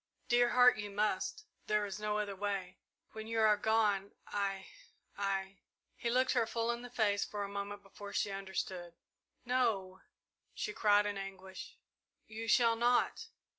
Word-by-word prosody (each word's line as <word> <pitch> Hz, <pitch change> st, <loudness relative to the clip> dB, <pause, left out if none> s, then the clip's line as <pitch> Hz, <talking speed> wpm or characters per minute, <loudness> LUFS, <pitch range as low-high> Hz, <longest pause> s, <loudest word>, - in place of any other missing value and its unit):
"Dear 240 Hz, 0 st, +5 dB
Heart, 250 Hz, -2 st, +6 dB
you 205 Hz, 0 st, -4 dB
must 205 Hz, -1 st, -1 dB, 0.2 s
there 210 Hz, -1 st, +2 dB
is 200 Hz, 0 st, -5 dB
no 210 Hz, 0 st, -1 dB
other 205 Hz, -2 st, -2 dB
way. 195 Hz, -2 st, -3 dB, 0.3 s
When 220 Hz, 0 st, -7 dB
you 225 Hz, 0 st, -1 dB
are 215 Hz, -1 st, +6 dB
gone 210 Hz, -2 st, +1 dB
I 195 Hz, -1 st, -2 dB, 0.5 s
I 195 Hz, -1 st, -2 dB, 0.2 s
" -, -, -50 dB
He 235 Hz, -, 0 dB
looked 255 Hz, +2 st, +3 dB
her 235 Hz, -3 st, +2 dB
full 230 Hz, +1 st, 0 dB
in 235 Hz, 0 st, -4 dB
the 245 Hz, -, -8 dB
face 210 Hz, -4 st, +1 dB
for 205 Hz, -1 st, -4 dB
a -, -, -3 dB
moment 200 Hz, 0 st, -5 dB
before 200 Hz, +1 st, -10 dB
she 200 Hz, -, 0 dB
understood. 190 Hz, -3 st, -4 dB, 0.5 s
"No!" 220 Hz, -7 st, 0 dB, 0.5 s
she 425 Hz, -, -3 dB
cried 205 Hz, -, +4 dB
in 205 Hz, -1 st, -2 dB
anguish; 190 Hz, -1 st, -8 dB, 0.5 s
"you 220 Hz, +1 st, -6 dB
shall 230 Hz, 0 st, +5 dB
not!" 240 Hz, +2 st, +2 dB
205 Hz, 165 wpm, -34 LUFS, 195-225 Hz, 0.5 s, Heart